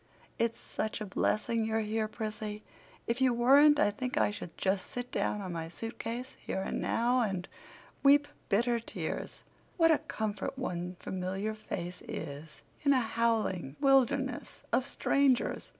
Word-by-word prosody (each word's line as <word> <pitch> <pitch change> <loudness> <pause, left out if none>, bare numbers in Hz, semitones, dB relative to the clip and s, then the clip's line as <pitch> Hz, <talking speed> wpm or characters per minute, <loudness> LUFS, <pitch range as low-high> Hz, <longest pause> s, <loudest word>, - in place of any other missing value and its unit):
"It's 230 0 0
such 215 +1 -3
a 215 - -3
blessing 215 +3 0
you're 220 0 0
here, 215 0 -1
Prissy. 215 -1 -5 0.4
If 235 +3 -1
you 255 -2 +4
weren't 285 +5 +6
I 205 - +4
think 250 +5 -4
I - - +3
should 175 -5 -8
just 190 0 0
sit 245 0 -5
down 210 - 0
on 185 -3 -5
my 165 -1 -3
suitcase, 230 +5 -5
here 190 - -3
and - - -2
now, 245 +2 +2
and 195 -5 -1 0.5
weep 290 +1 +6 0.2
bitter 235 +3 +2
tears. 230 - -5 0.3
What 330 -2 +6
a 315 - +4
comfort 215 +3 -3
one 180 -7 -3
familiar 190 +3 -3
face 180 -4 -6
is 150 0 -7 0.2
in 280 -1 +4
a 260 - +4
howling 225 - 0
wilderness 270 -1 +2
of 260 - +2
strangers!" 275 -2 +2
225 Hz, 150 wpm, -31 LUFS, 195-255 Hz, 0.5 s, weren't